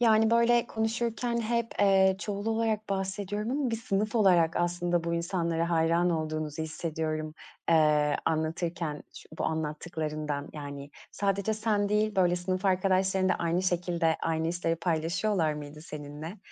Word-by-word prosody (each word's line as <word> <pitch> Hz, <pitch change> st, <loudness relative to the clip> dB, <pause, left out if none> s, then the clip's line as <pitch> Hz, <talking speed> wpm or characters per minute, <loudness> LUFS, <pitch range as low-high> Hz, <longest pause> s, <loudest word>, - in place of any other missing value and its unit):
Yani, 225 Hz, -1 st, +5 dB
böyle, 235 Hz, +1 st, +4 dB
konuşurken 230 Hz, +1 st, -1 dB
hep, 235 Hz, 0 st, 0 dB
eee, 190 Hz, -1 st, +5 dB
çoğul 205 Hz, 0 st, -4 dB
olarak 220 Hz, -1 st, 0 dB
bahsediyorum 200 Hz, +2 st, -2 dB
ama 270 Hz, -1 st, 0 dB
bir 225 Hz, -, 0 dB
sınıf 215 Hz, -1 st, -1 dB
olarak 180 Hz, -7 st, +4 dB
aslında 175 Hz, 0 st, 0 dB
bu 170 Hz, 0 st, -1 dB
insanlara 170 Hz, -1 st, -1 dB
hayran 170 Hz, +1 st, +3 dB
olduğunuzu 155 Hz, -1 st, -2 dB
hissediyorum, 155 Hz, -1 st, -3 dB, 0.4 s
eee, 150 Hz, -2 st, +4 dB
anlatırken 160 Hz, 0 st, -2 dB
ç -, -, -11 dB
bu -, -, -1 dB
anlattıklarından. 155 Hz, -2 st, -3 dB
Yani, 140 Hz, -1 st, -7 dB, 0.2 s
sadece 200 Hz, +1 st, 0 dB
sen 210 Hz, -2 st, 0 dB
değil, 210 Hz, 0 st, +1 dB
böyle, 180 Hz, -2 st, +3 dB
sınıf 185 Hz, +2 st, -2 dB
arkadaşların 190 Hz, 0 st, +2 dB
da -, -, +3 dB
aynı 170 Hz, +2 st, 0 dB
şekilde, 175 Hz, -2 st, +1 dB
aynı 160 Hz, 0 st, 0 dB
işleri 165 Hz, -1 st, -1 dB
paylaşıyorlar 165 Hz, +1 st, 0 dB
mıydı 150 Hz, 0 st, -8 dB
seninle? 150 Hz, +4 st, -8 dB
175 Hz, 140 wpm, -29 LUFS, 160-205 Hz, 0.4 s, Yani